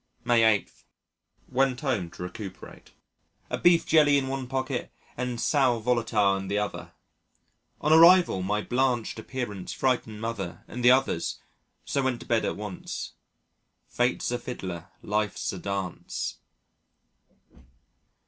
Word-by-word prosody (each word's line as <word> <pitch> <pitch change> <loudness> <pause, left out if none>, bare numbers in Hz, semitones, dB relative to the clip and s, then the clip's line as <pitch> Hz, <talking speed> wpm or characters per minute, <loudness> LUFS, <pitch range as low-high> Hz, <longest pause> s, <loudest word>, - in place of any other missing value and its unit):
May 120 -1 +4
8. 110 -2 +3 0.8
Went 130 -1 +1
home 115 - -1
to 90 - -9
recuperate, 95 +2 -9 0.6
a - - 0
beef 170 -1 +5
jelly 150 -3 +5
in 135 -1 0
one 135 -1 -3
pocket 130 +1 -3 0.2
and 125 -1 -3
sal 130 -5 +2
volatile 115 -4 +2
in 95 0 -6
the 100 +2 -1
other. 105 -1 -4 0.9
On 150 +1 +3
arrival, 170 - +7
my 105 +3 -1
blanched 125 -3 0
appearance 110 -6 -5
frightened 120 -5 -1
Mother 105 -6 -5
and 120 +1 -6
the 125 - +7
others, 130 -10 +2 0.5
so 140 - 0
went 130 -3 0
to - - -10
bed 115 -1 +1
at - - -2
once. 105 -3 -6 0.8
"Fate's 120 0 0
a 120 - -1
fiddler, 95 -8 -6 0.2
life's 105 0 -1
a 95 - -6
dance." 100 -2 -4
120 Hz, 130 wpm, -27 LUFS, 105-130 Hz, 0.9 s, arrival